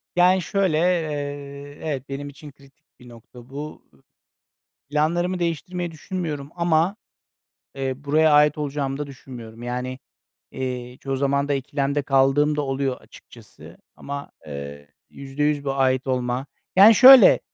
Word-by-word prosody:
Yani, 180 +1 +4
şöyle, 185 -2 0
eee, 145 -4 -3
evet, 140 -3 -4
benim 145 +1 -5
için 145 +1 -12
kritik 140 +2 -23
bir 125 0 -15
nokta 120 +1 -15
bu. 150 +3 -8 1.0
Planlarımı 170 +5 0
değiştirmeyi 175 +1 -3
düşünmüyorum 155 -4 -5
ama, 170 +3 +1 0.8
eee, 135 -1 -3
buraya 150 +3 +2
ait 150 0 +4
olacağımı 140 -2 -3
da 145 - -4
düşünmüyorum. 120 -4 -11
Yani, 125 +1 -4 0.5
eee, 125 -1 -5
çoğu 135 -1 -3
zaman 140 +1 0
da 145 - +1
ikilemde 140 +1 -2
kaldığım 135 +2 +2
da 150 - 0
oluyor, 135 -1 -2
açıkçası. - - -16 0.2
Ama 140 0 -7 0.2
eee, 70 0 -8 0.2
%100 145 +1 -2
bu 135 -1 -1
ait 130 -1 +1
olma, 125 +1 -2 0.3
yani, 205 +4 +9
şöyle, 260 +3 +9
140 Hz, 130 wpm, -23 LUFS, 135-155 Hz, 1.0 s, yani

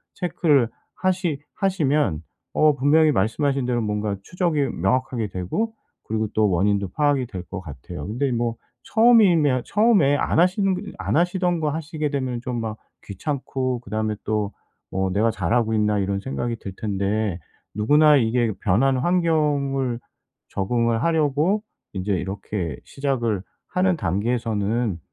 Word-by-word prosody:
체크를 150 - +2 0.3
하시 185 -5 0 0.2
하시면 150 - +1 0.3
어 155 -1 +4
분명히 150 +3 +4
말씀하신 135 +6 +1
대로 120 -1 0
뭔가 105 -1 -2
추적이 170 - 0
명확하게 120 +4 0
되고 95 - -2 0.4
그리고 110 0 0
또 110 -1 +3
원인도 100 +2 +1
파악이 145 +3 +1
될 95 -5 -6
것 95 +2 -7
같아요. 70 -8 -8
근데 125 +6 -1
뭐 120 -1 -1 0.3
처음이면 185 - +4
처음에 200 -10 +3
안 155 - +1
하시는 185 +2 +3 0.2
안 - - -2
하시던 180 0 +1
거 155 - +1
하시게 155 0 -3
되면은 130 -4 -2
좀 125 -1 -3
막 110 -1 -4 0.3
귀찮고 130 - -3
그다음에 110 -1 -2
또 105 -1 -1 0.4
뭐 95 0 0
'내가 110 +4 +2
잘하고 110 +4 0
있나?' 105 -1 +2
이런 100 0 -1
생각이 120 +1 -3
들 100 -3 -8
텐데 100 -2 -1 0.3
누구나 150 +7 +5
이게 120 -1 +1
변한 130 +7 +2
환경을 145 -6 +1 0.5
적응을 115 +3 0
하려고 160 +5 +2 0.3
인제 100 +1 -2
이렇게 95 -2 -4
시작을 120 -8 -1 0.3
하는 185 0 +2
단계에서는 110 - -1
125 Hz, 300 characters per minute, -23 LUFS, 105-150 Hz, 0.5 s, 누구나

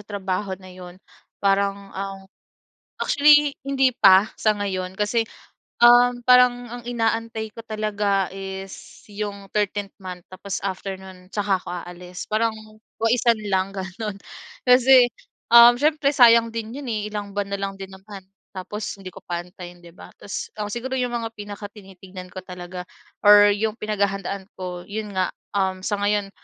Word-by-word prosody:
trabaho 195 -2 -4
na 185 -1 -14
yun, 180 -1 -11 0.4
parang 200 0 0
ang 195 0 -6 0.8
actually 295 0 +5
hindi 270 -2 +2
pa 195 0 +6
sa 215 -1 +1
ngayon, 190 -2 -3
kasi, 210 +3 +1 0.6
um, 245 0 +6
parang 245 -1 +4
ang 245 0 -7
inaantay 225 -2 -2
ko 230 - -9
talaga 205 -3 0
is 195 0 -8
yung 200 -1 -5
13th 205 -1 -1
month 180 -2 -8
tapos 195 +1 -5
after 195 0 -4
nun 185 -1 -13
tsaka 200 -2 0
ako - - -16 0.2
aalis 180 +1 -9
parang 225 +1 +1 0.5
waisan 235 +1 +3 0.2
lang 190 +1 +1
ganun. 195 +2 -5 0.5
Kasi, 250 0 +6 0.4
um, 235 0 +9
siyempre 300 -1 +2
sayang 235 -3 +7
din 225 +1 -5
yun, 275 - -8
eh, 210 -1 -3
ilang 205 -1 -6
buwan 205 -1 -2
na 200 - -2
lang 195 0 -2
din 195 0 -8
naman 195 0 -11 0.3
tapos 200 +4 -5
hindi 185 -1 -8
ko - - -11
pa 175 -1 -2
antayin 180 -1 -12
di 170 - -13
ba? - - -13
Tapos, 200 - -5
um, 210 - -2
siguro 260 +4 -4
yung 250 -1 -1
mga 230 -1 -2
pinakatinitignan 195 -3 -10
ko 185 - -6
talaga 180 -1 -8 0.4
or 205 0 +8
yung 215 +1 -1
pinaghahandaan 200 -2 -2
ko 180 -1 -6
yun 210 0 -5
nga, 185 -1 +1 0.3
um, 190 -1 0
sa 205 - -1
ngayon 205 -1 0
205 Hz, 155 wpm, -23 LUFS, 190-225 Hz, 0.8 s, um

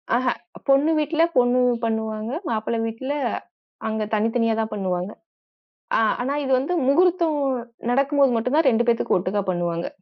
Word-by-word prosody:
ஆஹ. 255 +1 0 0.4
பொண்ணு 275 +4 +4
வீட்ல 315 +2 +1
பொண்ணு 245 0 +4 0.2
பண்ணுவாங்க. 220 0 -2 0.2
மாப்பிள்ளை 225 +1 -1
வீட்ல 260 +5 -4 0.8
அங்க 220 0 -2
தனித்தனியா 225 +1 +1
தான் 220 - -4
பண்ணுவாங்க. 185 -1 -2 0.9
அ - - +3 0.2
ஆனா 270 +3 -1
இது 265 - -1
வந்து 290 +7 -1
முகூர்த்தம் 335 +1 +3 0.5
நடக்கும்போது 275 +1 +3
மட்டும் 250 +6 0
தான் 305 -4 +4
2 235 +1 +1
பேத்துக்கும் 230 -5 +2
ஒட்டுக்கா 195 +3 -1
பண்ணுவாங்க. 175 -1 -2
240 Hz, 140 wpm, -23 LUFS, 220-275 Hz, 0.9 s, பொண்ணு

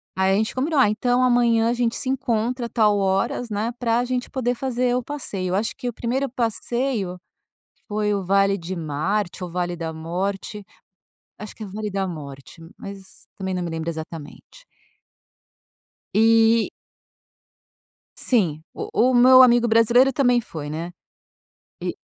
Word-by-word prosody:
Aí 190 0 +2
a - - +3
gente 220 +1 -1
combinou: 285 +3 0
"Ah, 250 - +5
então 245 +4 +1
amanhã 235 -2 +3
a - - +1
gente 235 -1 0
se 260 - -3
encontra 245 -1 -1
tal 210 -3 +3
horas, 195 +5 0
né, 215 +2 -2
pra 230 -1 +1
a 245 - 0
gente 250 0 -3
poder 250 -2 -1
fazer 250 -1 -1
o 250 - -1
passeio". 220 -10 -4
Eu - - +1
acho 215 +3 -1
que 250 - -6
o - - -7
primeiro 255 +5 -2
passeio 235 -4 -2 0.7
foi, 210 -1 0
o 200 -1 -2
Vale 195 +1 +2
de 180 +1 -6
Marte, 175 +5 -2
o 180 - -5
Vale 175 0 -2
da 165 -1 -4
Morte. 190 +6 -4 0.7
Acho 215 - -9
que 220 - -8
é - - -5
o 195 - -10
Vale 210 +1 -4
da 195 0 -1
Morte, 145 -2 -9 0.2
mas 195 0 -11
também 190 -1 -3
não 180 -1 -2
me 170 - -4
lembro 165 0 -4
exatamente. 160 - -9 1.5
Eh 225 +1 +4 1.5
Sim, 175 - +1
o - - -6 0.2
o - - +1
meu 255 +1 +8
amigo 240 -1 +5
brasileiro 235 +4 +4
também 245 -2 +2
foi, 155 -9 -7
né. 165 +3 -5 0.9
E - - -3
215 Hz, 165 wpm, -22 LUFS, 185-245 Hz, 1.5 s, meu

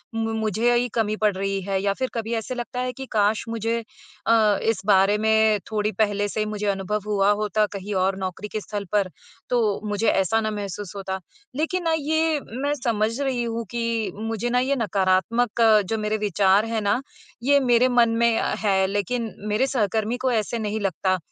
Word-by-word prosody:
मु 225 0 -1
मुझे 220 +2 +1
ही 245 +1 +2
कमी 215 -2 +1
पड़ 210 -1 +4
रही 195 0 -2
है 195 0 -1
या 200 0 +1
फिर 260 -1 -1
कभी 230 0 -3
ऐसे 230 +3 -3
लगता 245 0 -5
है 255 - -1
कि 265 - -7
काश 215 0 +2
मुझे 230 0 -1 0.5
अ, 220 -3 +4
इस 225 -4 0
बारे 200 0 +4
में 220 0 +3
थोड़ी 210 0 0
पहले 205 0 0
से 215 - -4
ही 215 - +1
मुझे 210 -1 -3
अनुभव 200 +1 -1
हुआ 205 0 +3
होता, 215 0 +1
कहीं 200 0 -6
और 190 0 +1
नौकरी 190 +2 -4
के 215 +1 -4
स्थल 205 0 -5
पर, 200 -3 +1 0.4
तो 220 -5 +1
मुझे 205 +2 0
ऐसा 195 +3 +2
ना 215 0 -1
महसूस 205 -1 -5
होता। 190 -1 -4 0.4
लेकिन 325 +5 -1
ना, 330 -1 +1
ये 315 +1 +1
मैं 275 +5 -2
समझ 225 +1 0
रही 260 -3 0
हूँ 230 0 -3
कि 230 -2 -1
मुझे 225 +2 -3
ना 250 +1 +2
ये 265 +2 +1
नकारात्मक 210 +2 +1 0.3
जो 225 - 0
मेरे 215 0 -1
विचार 200 0 +3
हैं 225 -1 -2
ना, 205 +5 +1 0.4
ये 285 +2 +5
मेरे 250 -1 +4
मन 240 -2 +4
में 235 -1 +3
अ, - - -1
हैं, 190 -3 +2
लेकिन 210 +3 -2 0.2
मेरे 255 +6 +2
सहकर्मी 220 -2 0
को 255 - +3
ऐसे 225 +1 -1
नहीं 215 0 -2
लगता। 185 -1 0
215 Hz, 195 wpm, -24 LUFS, 205-235 Hz, 0.5 s, ये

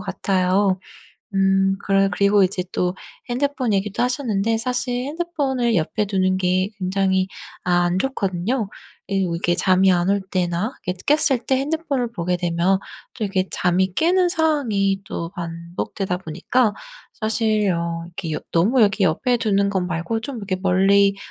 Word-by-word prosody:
같아요. 190 0 +1 0.5
음 195 0 +2
그래 195 0 +3
그리고 200 +1 +3
이제 185 -1 0
또 180 +1 -1 0.3
핸드폰 260 -2 0
얘기도 200 +2 0
하셨는데 230 -4 0
사실 250 +1 -1
핸드폰을 280 -7 -1
옆에 175 +6 0
두는 185 -1 +1
게 185 +1 +1
굉장히 190 0 +1 0.4
아 175 -1 +3
안 175 +1 +1
좋거든요. 205 -2 -1 0.4
이리고 190 -4 0
이게 175 0 +1
잠이 185 +1 +4
안 175 +1 +1
올 200 0 +2
때나 180 +5 -1
이렇게 180 0 -3
깼을 285 -4 +3
때 265 - +2
핸드폰을 280 -4 -1
보게 180 -1 -1
되면 175 +2 +1 0.3
또 220 - -3
이렇게 190 -2 0
잠이 180 +1 +1
깨는 355 - +3
상황이 245 - +1
또 170 -3 -5
반복되다 170 +3 -4
보니까 205 +7 0 0.4
사실 215 -2 0
어 170 -1 -2
이렇게 175 -2 -6
여 - - -2
너무 220 +9 +3
여기 200 -1 +3
옆에 215 +9 +2
두는 200 -3 +1
거 190 -2 0
말고 180 +5 -2
좀 265 0 -5
이렇게 195 -3 -3
멀리 195 +1 +4
195 Hz, 310 characters per minute, -22 LUFS, 180-230 Hz, 0.5 s, 잠이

